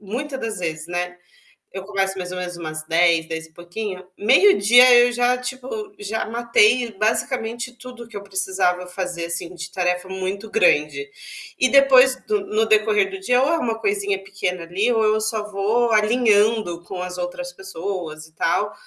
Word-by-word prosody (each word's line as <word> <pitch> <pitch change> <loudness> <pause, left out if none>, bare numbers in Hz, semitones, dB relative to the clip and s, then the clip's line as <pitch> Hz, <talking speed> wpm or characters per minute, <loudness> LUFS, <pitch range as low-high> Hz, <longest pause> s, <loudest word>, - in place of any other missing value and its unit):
muita 255 +8 -5
das 225 -5 -5
vezes, 160 -3 -4
né, 180 0 -3 0.6
eu 190 0 -7
começo 195 -1 -2
mais 180 0 -5
ou 180 - -5
menos 180 -1 -5
umas 155 -2 -6
10, 165 0 +3
dez 160 0 -5
e 160 - -26
pouquinho, 185 +3 -7
meio-dia 245 - +6
eu 240 0 +5
já, 245 +1 +2
tipo, 250 +1 -7 0.3
já 210 +2 -3
matei 235 +1 +2
basicamente 235 +2 -1
tudo 245 -1 -11
que 235 - -12
eu 200 - -6
precisava 190 -2 -1
fazer, 180 -2 -5
assim, 170 +1 -5
de 170 0 -8
tarefa 180 0 -1
muito 190 +3 -5
grande. 420 - +2 0.5
E 255 - +3
depois, 265 -1 +6
do 210 -1 0
no 215 +2 0
decorrer 210 -2 +2
do 195 0 -7
dia, 250 +6 +2
ou 275 - +2
é 330 - +2
uma 230 -7 -2
coisinha 200 -2 -1
pequena, 190 -2 -4
ali, 190 +8 -1
ou 225 -1 +1
eu 215 0 +2
só 215 -1 -2
vou 225 +4 +1
alinhando 215 -4 +2
com 180 -1 -6
as 180 0 -6
outras 265 +10 -5
pessoas, 180 -6 -6
e 160 - -23
tal, - - 0
200 Hz, 175 wpm, -21 LUFS, 180-235 Hz, 0.6 s, meio-dia